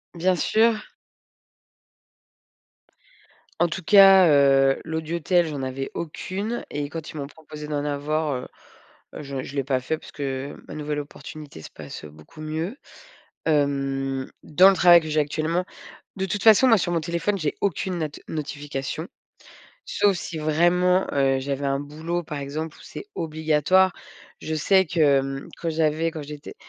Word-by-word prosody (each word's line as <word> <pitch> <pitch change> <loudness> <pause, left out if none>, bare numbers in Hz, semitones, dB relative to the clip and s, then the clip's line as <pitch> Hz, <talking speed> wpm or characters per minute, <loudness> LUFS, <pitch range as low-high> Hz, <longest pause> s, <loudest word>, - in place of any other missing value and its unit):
Bien 180 +2 +2
sûr. 220 +4 +2 2.8
En 175 - +5
tout 180 +2 -5
cas, 195 -1 +8
heu, 135 -2 +4
l'audiotel, 165 +2 0
j'en 145 -4 -4
avais 130 +1 -4
aucune 195 +7 -4
et 145 0 -3
quand 160 +1 -7
ils - - -9
m'ont 140 -1 -4
proposé 150 0 -10
d'en 145 -1 -2
avoir, 150 +1 -1
heu 125 - -5 0.7
heu, - - -6
je 135 -2 -5
je 135 - -9
l'ai 140 - 0
pas 130 -1 +1
fait 160 +5 -2
parce - - -14
que 135 -1 -4
ma - - -7
nouvelle 150 -1 -3
opportunité 145 - -10
se - - -10
passe, - - -9
heu, - - -9
beaucoup 80 - -16
mieux, 160 - -4 0.7
hem, 135 -3 0 0.2
dans 180 +5 +6
le - - +2
travail 175 -1 +7
que 155 - -7
j'ai 155 0 +1
actuellement. 155 +4 -1 0.5
De 190 0 -1
toute 200 +2 -3
façon 225 +3 +7
moi 225 -3 +6
sur 175 - -1
mon 170 - +1
téléphone, 170 +5 -1
j'ai 155 -4 -1
aucune 185 -1 -1
not 155 -2 -1 0.2
notification, 145 0 -5 0.8
sauf 205 - +2
si 170 -1 -6
vraiment, 175 +4 +2
heu, 135 -1 +2
j'avais 140 +1 -3
un 140 0 0
boulot 160 +4 -4
par 150 -1 -5
exemple, 150 +3 -5
où - - -18
c'est 400 - -9
obligatoire. 160 +3 +2 0.5
Je 160 - -3
sais 190 +5 +3
que, 165 +1 -2
hem, 135 -2 +2
quand 170 - -2
j'avais 160 +1 +1
quand 155 -2 -6
j'étais 145 0 -9
155 Hz, 160 wpm, -24 LUFS, 140-175 Hz, 2.8 s, cas